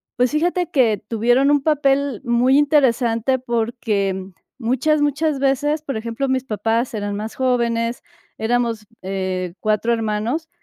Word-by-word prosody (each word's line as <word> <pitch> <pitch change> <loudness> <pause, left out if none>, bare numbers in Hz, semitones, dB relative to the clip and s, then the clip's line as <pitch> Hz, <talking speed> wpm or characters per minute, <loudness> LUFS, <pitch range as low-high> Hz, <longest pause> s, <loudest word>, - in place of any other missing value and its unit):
pues, 250 0 +2
fíjate 345 +3 0
que 235 - +2
tuvieron 240 +5 +2
un 290 -1 +3
papel 280 -5 +1
muy 245 +2 +3
interesante, 260 -4 +2
porque 220 -6 -1 0.3
muchas 270 +5 +1
muchas 290 0 0
veces, 290 +3 +1
por 275 -6 -4
ejemplo, 230 +4 -3
mis 260 -1 0
papás 225 +2 -1
eran 205 -1 -3
más 215 +2 -5
jóvenes, 235 -1 0 0.3
éramos, 230 -1 -1 0.2
eh, 185 -2 -3
4 215 +2 0
hermanos, 225 +8 -1
240 Hz, 130 wpm, -20 LUFS, 220-275 Hz, 0.3 s, un